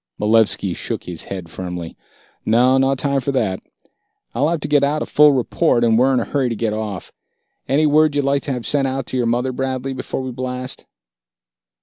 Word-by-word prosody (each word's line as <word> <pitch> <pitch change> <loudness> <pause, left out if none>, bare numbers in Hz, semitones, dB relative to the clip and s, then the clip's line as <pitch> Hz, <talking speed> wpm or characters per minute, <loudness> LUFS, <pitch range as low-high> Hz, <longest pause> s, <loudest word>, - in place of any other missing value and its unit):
Malevski 105 -3 +2
shook - - -4
his 85 -2 -4
head 95 -3 -6
firmly. 90 0 -6 0.5
"No, 125 +4 +3
no 135 +1 +2
time 140 +1 0
for 140 - -1
that. 95 -8 -1 0.7
I'll 140 +6 +1
have 170 -2 -1
to - - -3
get 145 -1 +3
out 150 +2 +1
a - - -5
full 150 0 +5
report, 130 0 +1
and 115 -1 +3
we're 130 +4 +4
in 130 - +2
a - - -2
hurry 135 -3 0
to 115 - -2
get 110 -1 -1
off. 105 -3 -5 0.5
Any 150 +3 +2
word 150 0 +3
you'd 145 -1 +1
like 140 0 +1
to 140 - -2
have 125 -3 -3
sent 140 -2 +1
out 135 0 -3
to - - 0
your 120 -2 +1
mother, 120 +3 0
Bradley, 130 +1 -3
before 130 0 -4
we 130 - -4
blast?" 125 +1 -5
130 Hz, 210 wpm, -20 LUFS, 115-140 Hz, 0.7 s, full